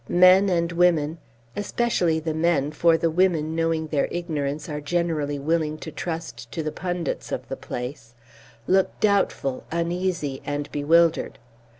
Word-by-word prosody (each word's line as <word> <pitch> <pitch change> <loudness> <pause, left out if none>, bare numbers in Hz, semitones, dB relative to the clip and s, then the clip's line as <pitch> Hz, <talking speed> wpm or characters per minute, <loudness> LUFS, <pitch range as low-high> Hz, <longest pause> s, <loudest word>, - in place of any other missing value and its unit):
Men 185 +2 +6
and 170 -1 +1
women, 170 -2 +2 0.4
especially 205 -6 0
the 160 0 -3
men, 160 -3 +1
for 165 +1 +3
the 165 0 0
women 160 -3 +1
knowing 165 -1 0
their 150 -2 0
ignorance 155 -3 -3
are 150 -2 -4
generally 155 -2 -1
willing 155 +1 0
to 160 - -8
trust 160 -10 -6
to 160 - -2
the 155 - -2
pundits 175 -1 -3
of - - -4
the - - -3
place, 125 -1 -7 0.5
look 190 +5 +2
doubtful, 200 -10 +1
uneasy, 170 -4 -2
and 145 0 -4
bewildered. 160 +2 +2
165 Hz, 140 wpm, -24 LUFS, 150-175 Hz, 0.5 s, Men